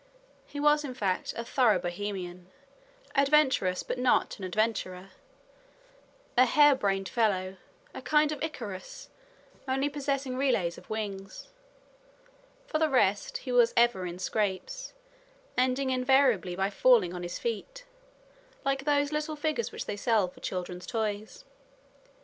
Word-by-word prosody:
He 290 - -7
was, 295 +1 +4
in 260 -3 -6
fact, 195 -6 -1
a 230 - -4
thorough 235 -5 +3
Bohemian, 180 0 -5 0.7
adventurous, 275 -10 +3
but - - -4
not 250 -3 +2
an - - -8
adventurer; 190 -2 -2 1.2
a 255 - +6
hare 290 +3 +6
brained 195 -6 -1
fellow, 190 -5 0 0.4
a - - -7
kind 300 0 +3
of 300 - -5
Icarus, 230 - -6 0.6
only 270 +2 0
possessing 275 -2 -2
relays 210 -11 0
of - - -20
wings. 200 - -5 1.2
For 310 -10 -2
the 315 -1 +2
rest, 205 -7 +1
he 255 - -3
was 240 -2 +4
ever 235 -6 +3
in 175 0 -6
scrapes, 210 - -2 0.6
ending 260 +1 +1
invariably 255 -8 +3
by 195 +2 0
falling 215 -6 +4
on 180 - -5
his 175 0 -5
feet, 235 - -5 0.8
like 270 0 0
those 290 -1 +2
little 305 +1 -2
figures 310 +9 -2
which - - -6
they 205 - -4
sell 215 -2 +2
for 180 - -14
children's 180 -1 -5
toys. 220 - -3
235 Hz, 135 wpm, -29 LUFS, 190-275 Hz, 1.2 s, a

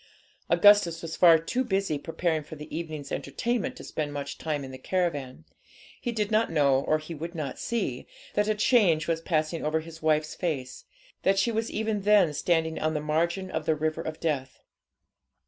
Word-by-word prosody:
Augustus 205 -6 +5
was 165 -1 -5
far 170 -2 +7
too 205 +11 -1
busy 195 - -1
preparing 165 +1 -1
for 150 +2 -10
the 150 0 -8
evening's 155 -4 -5
entertainment 245 +2 -2
to - - -10
spend 150 -2 -3
much 140 -1 -5
time 150 -3 -2
in 130 - -8
the 130 - -9
caravan. 145 - -2 0.6
He 240 - -2
did 215 -2 -2
not 220 -2 +2
know 140 -4 +3
or 155 - +1
he 155 +2 -8
would 165 +3 -6
not 150 -5 -4
see, 205 - -2 0.3
that 210 0 +1
a 215 - +2
change 205 -9 +3
was 165 -1 0
passing 160 -1 -1
over 155 +1 0
his 160 0 -11
wife's 155 -1 +1
face, 135 -7 -4 0.4
that 195 0 +2
she 215 +5 +2
was 225 +1 -1
even 220 -1 -1
then 200 -6 +4
standing 160 +1 0
on 155 0 0
the - - +1
margin 170 +5 -1
of 160 -1 -3
the 160 - +3
river 155 +1 -1
of 160 -1 -6
death. 140 -5 -3
160 Hz, 190 wpm, -27 LUFS, 150-195 Hz, 0.6 s, far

